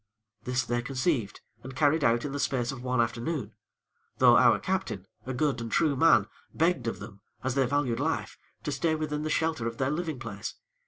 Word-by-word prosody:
This 125 Hz, 0 st, 0 dB
they 120 Hz, 0 st, 0 dB
conceived 130 Hz, -, -1 dB, 0.2 s
and 130 Hz, +1 st, -9 dB
carried 150 Hz, +2 st, +3 dB
out 120 Hz, +1 st, +3 dB
in 145 Hz, -, -3 dB
the 145 Hz, -, -3 dB
space 125 Hz, -3 st, 0 dB
of 135 Hz, -2 st, -8 dB
one 125 Hz, -1 st, 0 dB
afternoon; 115 Hz, +1 st, -1 dB, 0.6 s
though -, -, +7 dB
our -, -, +6 dB
Captain, -, -, -2 dB, 0.2 s
a 130 Hz, -, -2 dB
good 145 Hz, -3 st, 0 dB
and 115 Hz, -1 st, -5 dB
true 150 Hz, +1 st, +2 dB
man, 165 Hz, +5 st, +5 dB, 0.3 s
begged 165 Hz, -7 st, +1 dB
of 115 Hz, -, -2 dB
them, 100 Hz, -1 st, -11 dB, 0.2 s
as 130 Hz, 0 st, 0 dB
they 135 Hz, -1 st, +2 dB
valued 130 Hz, -3 st, 0 dB
life, 160 Hz, +3 st, -1 dB, 0.3 s
to 150 Hz, -, -2 dB
stay 160 Hz, +4 st, +1 dB
within 150 Hz, -1 st, -2 dB
the 155 Hz, -, -2 dB
shelter 160 Hz, -7 st, 0 dB
of 115 Hz, 0 st, -5 dB
their 130 Hz, +1 st, 0 dB
living 160 Hz, -2 st, -2 dB
place. 115 Hz, -4 st, -6 dB
130 Hz, 200 wpm, -28 LUFS, 120-150 Hz, 0.6 s, though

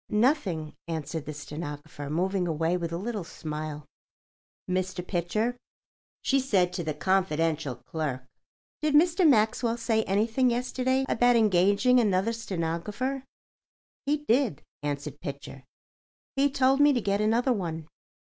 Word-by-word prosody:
"Nothing," 210 Hz, -, +1 dB
answered 160 Hz, -1 st, -4 dB
the 155 Hz, -, -4 dB
stenographer, 150 Hz, -1 st, -7 dB
moving 180 Hz, +3 st, 0 dB
away 165 Hz, +2 st, 0 dB
with 170 Hz, -2 st, -3 dB
a 170 Hz, -, -2 dB
little 210 Hz, +1 st, -3 dB
smile. 155 Hz, -2 st, -6 dB, 0.8 s
"Mr. 185 Hz, -1 st, -2 dB
Pitcher," 210 Hz, +7 st, 0 dB, 0.7 s
she 275 Hz, -, +3 dB
said 190 Hz, -9 st, +2 dB
to 180 Hz, -, -3 dB
the 155 Hz, -2 st, -3 dB
confidential 160 Hz, -5 st, 0 dB
clerk, 130 Hz, +1 st, -4 dB, 0.6 s
"did 305 Hz, -1 st, +1 dB
Mr. 340 Hz, +2 st, +5 dB
Maxwell 230 Hz, 0 st, +2 dB
say 230 Hz, -1 st, +1 dB
anything 225 Hz, +6 st, +2 dB
yesterday 255 Hz, +2 st, 0 dB
about 245 Hz, 0 st, +3 dB
engaging 210 Hz, +4 st, +4 dB
another 205 Hz, 0 st, +2 dB
stenographer?" 210 Hz, +6 st, -3 dB, 0.8 s
"He 295 Hz, +1 st, +3 dB
did," 235 Hz, -, +2 dB, 0.2 s
answered 145 Hz, 0 st, -4 dB
Pitcher. 140 Hz, -2 st, -7 dB, 0.7 s
"He 280 Hz, +1 st, +3 dB
told 270 Hz, 0 st, +3 dB
me 290 Hz, 0 st, +6 dB
to 250 Hz, -, +1 dB
get 200 Hz, 0 st, 0 dB
another 235 Hz, +4 st, +2 dB
one. 165 Hz, -6 st, -4 dB
190 Hz, 130 wpm, -28 LUFS, 160-245 Hz, 0.8 s, me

